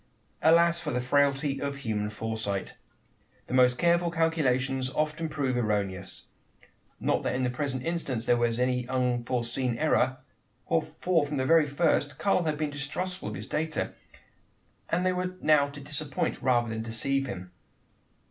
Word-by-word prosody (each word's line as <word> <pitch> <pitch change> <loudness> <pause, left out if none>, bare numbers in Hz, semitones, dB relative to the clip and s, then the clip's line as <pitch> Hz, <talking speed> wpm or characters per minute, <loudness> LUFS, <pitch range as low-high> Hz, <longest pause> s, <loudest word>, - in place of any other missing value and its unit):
Alas! 170 +1 +5
for 165 - -4
the 125 - 0
frailty 140 +2 +2
of 140 0 -1
all - - -10
human 110 -6 -2
foresight! 110 -2 -3 0.7
The - - -7
most 125 -1 +5
careful 170 +1 +3
calculations 135 -6 +1
often 155 +3 -1
prove 140 -4 -1
erroneous 100 -5 -2 0.8
not - - +1
that - - -1
in 130 - 0
the 125 - +1
present 130 -1 -3
instance 140 -8 -2
there 120 - +4
was 120 -1 +1
any 125 0 0
unforeseen 125 -1 -1
error: 130 -3 +2 0.5
for 175 -4 +1
from 145 - -3
the 130 -1 0
very 160 0 +5
first, 145 -2 +1
Karl 185 +1 +2
had 155 -1 0
been 150 -1 -1
distrustful 155 +6 -4
of - - -6
his - - -6
data; 155 0 -2 1.0
and 180 +2 +1
they 185 - +3
were 180 0 -2
now 145 -2 +4
to 140 0 -9
disappoint, 145 +4 -3
rather 120 -2 +2
than 110 0 -3
deceive 135 +5 -1
him. 90 -6 -7
135 Hz, 155 wpm, -28 LUFS, 125-155 Hz, 1.0 s, Alas